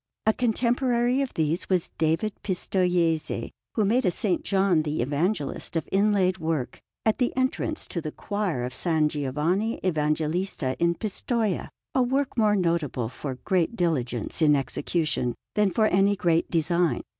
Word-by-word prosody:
A 220 - +4
contemporary 245 +2 +1
of 270 - -2
these 160 +2 -1
was 185 -3 +1
David 165 +7 +1
Pistoiese, 180 -4 0 0.2
who 215 - +2
made 240 +6 +2
a - - +1
S. 180 +6 0 0.2
John 190 -4 +2
the 150 -4 -1
Evangelist 150 - -1
of 165 - -1
inlaid 195 -2 +2
work 160 -5 -2 0.2
at 220 - +2
the 245 - +2
entrance 260 +4 -1
to 170 - -3
the 155 - -5
choir 200 -12 -2
of 125 - -3
S. 155 +1 +1
Giovanni 155 - -1
Evangelista 155 -2 0
in 170 0 +2
Pistoia 215 0 -2 0.2
a 260 - +3
work 265 +2 0
more 215 -3 +3
notable 165 - 0
for 130 +1 -5
great 185 +3 +1
diligence 135 - -1
in 150 -2 +6
execution 140 -1 -1 0.2
than 210 -1 +3
for 220 +3 +2
any 200 0 +3
great 170 -3 +1
design. 170 +1 +1
175 Hz, 150 wpm, -26 LUFS, 155-210 Hz, 0.2 s, in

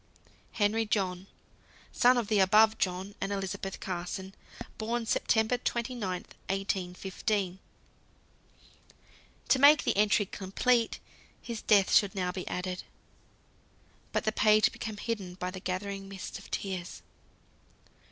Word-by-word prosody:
"Henry 215 +1 +2
John, 190 -3 -1 0.6
son 250 +1 +4
of 235 -4 0
the 215 -1 +2
above 215 +3 +5
John 185 +2 -1
and 195 - -2
Elizabeth 195 -1 -4
Carson. 185 +1 -5 0.5
Born, 230 +2 -2
Sept. - - -1
29th, 240 +2 +1 0.5
1815." 190 0 -2 1.9
To 265 - +5
make 290 +2 +7
the - - +1
entry 205 0 +3
complete, 225 +6 0 0.4
his 230 -2 -6
death 200 -3 +4
should 200 -2 +4
now 180 -2 -1
be 185 0 -6
added. 180 0 -3 1.3
But - - 0
the 215 - +1
page 215 +1 +4
became 215 -2 -6
hidden 200 -5 -4
by 180 0 -4
the 185 - -7
gathering 195 +2 -4
mist 195 0 -7
of 195 - -14
tears. 185 -3 -4
200 Hz, 120 wpm, -30 LUFS, 185-220 Hz, 1.9 s, make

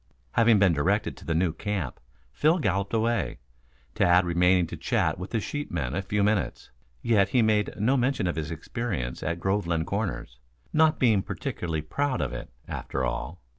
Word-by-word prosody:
Having 115 - +5
been 95 -3 +4
directed 100 +8 0
to - - -13
the 80 - -1
new 85 -1 +2
camp, 100 -10 -3 0.3
Phil 155 - +3
galloped 100 - 0
away, 115 +1 0 0.6
Tad 90 +1 +4
remaining 90 +1 +3
to - - -7
chat - - 0
with 90 - -6
the 115 - 0
sheepman 85 - -3
a 100 - -1
few 105 +1 0
minutes. 105 -1 -1 0.3
Yet 105 -4 +3
he 125 0 +3
made 105 -1 +1
no 120 +7 +3
mention 125 -4 +1
of 90 - -1
his 80 -1 -3
experience 85 - -4
at 85 +2 -2
Groveland 85 -4 0
Corners, 100 - -3 0.3
not 155 0 +4
being 110 -6 +3
particularly 80 -4 -3
proud 135 - -1
of - - -2
it, - - -6 0.2
after 65 - -3
all. 80 +7 -4
100 Hz, 170 wpm, -27 LUFS, 85-115 Hz, 0.6 s, Having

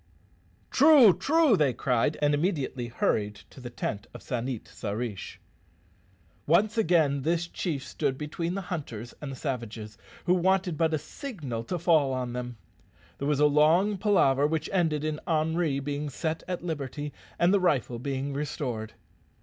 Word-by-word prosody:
"True, 275 - +7
true," 315 - +3
they 145 -7 +2
cried, 125 +3 0
and 145 0 +4
immediately 145 -6 -1
hurried 105 -2 0 0.2
to - - -13
the 120 - -6
tent 105 -3 -4
of - - -10
San 125 -1 -3
it 125 -5 -5
sa 105 +1 -6
rish. 110 -3 -5 1.1
Once 200 +8 +3
again 160 -10 +2
this 165 +4 0
chief 150 -6 -3
stood 130 0 -2
between 165 +4 -3
the 195 - -2
hunters 140 - -6
and 145 -2 -5
the - - -6
savages, 115 -6 -5 0.3
who 180 - +4
wanted 185 -1 +2
but 160 0 +1
a - - +1
signal 145 - -6
to 180 - -2
fall 155 -5 +3
on 125 -1 -3
them. 125 -1 -5 0.6
There 140 - -2
was 150 -1 +1
a 150 - +5
long 160 +8 +4
palaver, 145 -9 +3
which 160 0 -2
ended 160 -5 +1
in 155 0 -2
Henri 160 -2 +1
being 145 +1 -3
set 160 +4 -3
at 180 -2 -4
liberty 145 -3 -4 0.2
and 175 +3 +3
the 200 - +4
rifle 135 -9 +1
being 140 +2 -3
restored. 130 -6 -4
150 Hz, 165 wpm, -28 LUFS, 130-175 Hz, 1.1 s, True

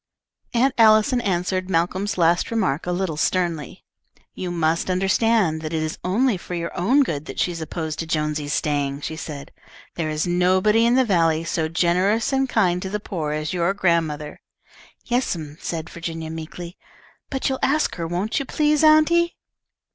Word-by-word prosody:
Aunt 255 +3 +3
Allison 220 +2 +5
answered 185 -2 -1
Malcolm's 185 +4 0
last 170 0 +2
remark 180 -10 -1
a - - 0
little 175 -3 -2
sternly. 170 -3 -1 0.5
"You 185 - -5
must 165 0 0
understand 190 -2 +2
that 155 0 -5
it 160 -1 0
is 155 - -4
only 215 +4 +1
for 175 0 -7
your 170 0 -4
own 255 +11 +3
good 155 - -4
that - - -7
she 180 - +1
is 165 -1 -6
opposed 160 0 -4
to 165 - -3
Jonesy's 150 -2 -1
staying," 145 -1 -1
she 160 - -4
said. 150 -3 -7 0.4
"There 160 -2 -2
is 155 0 -1
nobody 185 +6 +3
in 240 - +3
the 260 0 +4
valley 165 -6 +2
so 165 -1 -1
generous 185 - +1
and 270 0 +1
kind 180 -6 +2
to 190 - -4
the 210 +2 -2
poor 170 -8 -4
as 155 +1 -3
your 180 +2 0
grandmother." 165 -5 -1 0.6
"Yes'm," 170 - -2
said 160 -1 -4
Virginia, 165 -1 -6
meekly, 170 +2 -8 0.5
"but 265 -1 -2
you'll 265 -1 -1
ask 300 +3 +1
her, 165 -1 -3
won't 180 - -1
you 275 - -3
please, 300 +2 +1
auntie?" 315 +2 +4
175 Hz, 170 wpm, -22 LUFS, 160-215 Hz, 0.6 s, Allison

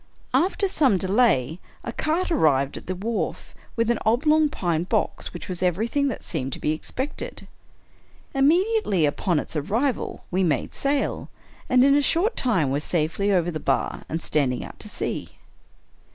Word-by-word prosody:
After 390 +3 +2
some 285 - +3
delay, 185 - +2 0.2
a 235 - -5
cart 325 +7 0
arrived 140 - +2
at - - -9
the 185 - -2
wharf, 220 +5 -3 0.2
with 230 0 +2
an 235 - 0
oblong 300 +7 +3
pine 170 - -1
box, - - -1
which 175 - -8
was 180 -1 -4
everything 220 - +1
that 265 - -4
seemed 130 0 -3
to - - -5
be 150 - 0
expected. 260 - -5 0.9
Immediately 310 - +3
upon 155 +3 +1
its - - -7
arrival 225 - -1
we 185 +1 +2
made 150 -8 0
sail, 280 0 -1 0.4
and 255 0 +5
in 275 - +5
a 290 - +4
short 350 - +2
time 185 - +1
were 140 - +1
safely 170 +6 0
over 175 -2 +2
the 155 - -4
bar - - -1
and 160 +1 -3
standing 130 -5 0
out - - -12
to - - -8
sea. - - -4
205 Hz, 165 wpm, -24 LUFS, -, 0.9 s, and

